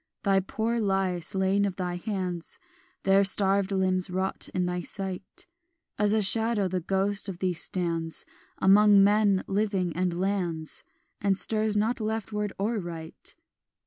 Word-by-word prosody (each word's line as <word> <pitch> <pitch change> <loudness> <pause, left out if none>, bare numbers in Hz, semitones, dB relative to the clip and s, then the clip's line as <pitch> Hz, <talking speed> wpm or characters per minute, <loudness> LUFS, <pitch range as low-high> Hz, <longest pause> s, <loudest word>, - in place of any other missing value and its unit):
"Thy 195 -1 +3
poor 225 +5 -2
lie 195 -4 0
slain 190 +4 0
of 195 -2 -1
thine 180 -1 -3
hands, 185 -4 -4 0.5
Their 195 +1 +4
starved 195 0 +3
limbs 185 -1 +1
rot 190 +1 -3
in 180 -1 -1
thy 180 0 -2
sight; 195 - -5 0.5
As 210 0 +3
a 220 -1 +2
shadow 220 0 +4
the 185 0 -2
ghost 195 +3 0
of 185 - -6
thee 185 0 -1
stands 165 -2 -2 0.3
Among 200 +1 +6
men 205 -1 +3
living 195 -4 -1
and 180 -1 -1
lands, 180 -5 -2 0.4
And 195 -1 +1
stirs 215 0 +2
not 225 +5 0
leftward 215 -1 -3
or 215 +3 -1
right. 165 -3 -6
195 Hz, 145 wpm, -27 LUFS, 180-205 Hz, 0.5 s, Among